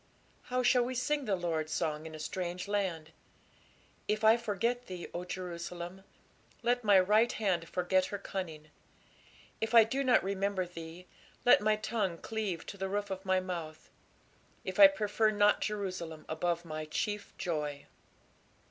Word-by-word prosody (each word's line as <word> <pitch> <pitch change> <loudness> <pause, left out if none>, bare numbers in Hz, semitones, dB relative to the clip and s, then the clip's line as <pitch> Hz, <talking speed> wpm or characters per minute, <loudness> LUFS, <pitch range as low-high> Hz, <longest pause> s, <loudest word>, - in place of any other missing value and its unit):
How 250 0 0
shall 250 0 +5
we 255 +1 -3
sing 285 +3 0
the 205 -4 +1
Lord's 165 -3 -2
song 155 0 -2
in 155 - -9
a - - -9
strange 180 +3 -4
land? 185 -6 -2 1.0
If 215 +1 0
I 220 +1 +7
forget 235 +2 -1
thee, 180 -2 -6
O 175 +1 -4
Jerusalem, 180 +1 -6 0.6
let 245 +1 +1
my 205 -3 +6
right 210 +5 +4
hand 180 -6 -1
forget 185 +1 +1
her 200 - -4
cunning. 160 -6 -6 0.9
If 220 +1 0
I 230 - +10
do 265 +5 -1
not 255 -2 +4
remember 195 -1 -1
thee, 170 0 -9 0.4
let 245 - +7
my 215 0 +3
tongue 210 -5 -2
cleave 205 -4 -3
to 200 - -8
the 190 0 -3
roof 205 0 -2
of 190 +1 -5
my 185 0 +3
mouth; 170 -4 -6 0.7
if - - -4
I 295 - +12
prefer 220 -6 +1
not 205 -1 +3
Jerusalem 185 -6 -4
above 170 +2 -1
my 155 -1 -5
chief 205 +6 -3
joy. 150 -4 -3
190 Hz, 155 wpm, -32 LUFS, 170-215 Hz, 1.0 s, I